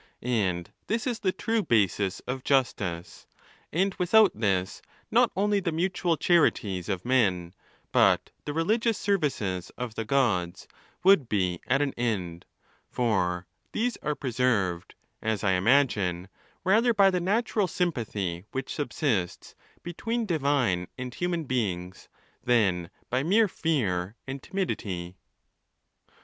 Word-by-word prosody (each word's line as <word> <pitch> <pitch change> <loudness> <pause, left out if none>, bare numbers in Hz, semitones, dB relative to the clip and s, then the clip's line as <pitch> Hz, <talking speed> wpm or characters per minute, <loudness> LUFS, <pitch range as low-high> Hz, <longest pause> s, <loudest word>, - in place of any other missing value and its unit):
'And 95 -8 -1 0.2
this 230 +2 -1
is 240 -4 -2
the 185 - +1
true 225 +3 -1
basis 100 - +1
of 130 +1 -5
justice, 100 -11 -1 0.4
and 190 +4 +1
without 205 +3 +5
this 95 -4 -1 0.3
not - - +4
only 205 +2 +2
the 180 -3 -2
mutual 175 0 0
charities 105 - +2
of 95 0 -2
men, 95 -9 +1 0.4
but - - +3
the 150 - -3
religious 220 +8 +1
services 125 - -1
of 125 -2 -4
the 115 - -3
Gods, 105 -9 0 0.4
would 180 -10 +5
be 90 -4 0
at 140 +2 +3
an 140 - -2
end; 95 -8 -2 0.4
for 90 -7 0 0.3
these 240 +2 0
are 150 - -2
preserved, 115 -10 -1 0.3
as 110 -3 -1
I 100 - +3
imagine, 95 -4 +2 0.3
rather 225 +5 +3
by 195 -1 +5
the 180 -1 0
natural 210 +1 +1
sympathy 110 - -2
which 135 - -4
subsists 135 - -2 0.3
between 225 +7 -3
divine 140 - +1
and 125 -1 -5
human 175 +1 -2
beings, 95 - -3 0.3
than 100 -9 +2 0.2
by 130 +1 +2
mere 205 +9 +4
fear 110 - -1
and 135 0 -6
timidity. 95 - -3
125 Hz, 125 wpm, -27 LUFS, -, 0.4 s, without